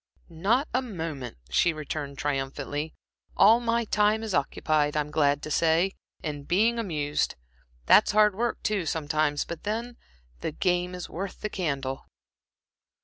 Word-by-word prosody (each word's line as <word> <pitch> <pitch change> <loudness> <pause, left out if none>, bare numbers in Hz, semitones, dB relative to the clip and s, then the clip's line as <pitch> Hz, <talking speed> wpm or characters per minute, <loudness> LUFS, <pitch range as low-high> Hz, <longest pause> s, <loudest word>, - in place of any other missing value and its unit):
"Not 205 - +1
a 255 - +2
moment," 160 - -5
she 165 - +3
returned, 150 -2 -5
triumphantly. 145 +2 -3 0.4
"All 220 +4 +7
my 235 -1 0
time 210 +1 +2
is 220 -3 -3
occupied, 150 0 +1
I'm 150 0 -1
glad 145 -1 +2
to 155 - -5
say, 165 +5 +3 0.3
in 145 -3 -4
being 220 +8 +2
amused. 150 -8 -1 0.5
That's - - +6
hard 210 0 +5
work, 235 +4 -2
too, 200 -6 0
sometimes, 150 -1 0
but 170 - -7
then 230 +3 -3 0.4
the 150 - -3
game 180 +1 0
is 180 - -6
worth 190 +2 -6
the 210 - -3
candle." 135 -7 -3
165 Hz, 145 wpm, -27 LUFS, 145-210 Hz, 0.5 s, All